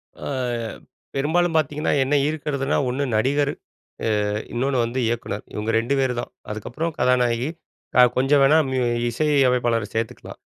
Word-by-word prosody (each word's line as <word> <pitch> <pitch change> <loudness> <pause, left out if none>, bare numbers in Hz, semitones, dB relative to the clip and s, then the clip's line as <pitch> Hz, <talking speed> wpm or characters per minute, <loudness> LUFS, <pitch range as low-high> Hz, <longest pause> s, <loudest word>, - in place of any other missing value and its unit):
அ - - -19 1.0
பெரும்பாலும் 165 +5 +1
பாத்தீங்கன்னா, 150 0 0
என்ன 135 +3 +1
ஈர்க்கறதுனா 145 -3 -1
ஒண்ணு 130 +3 -1
நடிகர் 140 +6 +2 0.8
அ - - -1 0.2
இன்னொன்னு 130 +2 0
வந்து 125 +3 -3
இயக்குனர். 115 -3 -3
இவங்க 105 +2 -2
2 120 +5 -1
பேர் 130 -2 +1
தான். - - -9 0.2
அதுக்கப்புறம் 125 +10 -4
கதாநாயகி, 125 +1 +2 0.5
அ - - +10
கொஞ்சம் 135 +2 +4
வேணா 145 +3 +6
முயு 130 -2 0 0.3
இசை 155 +6 0 0.2
அமைப்பாளர 120 -4 +1
சேர்த்துக்கலாம். 115 0 -4
130 Hz, 135 wpm, -23 LUFS, 120-145 Hz, 1.0 s, அ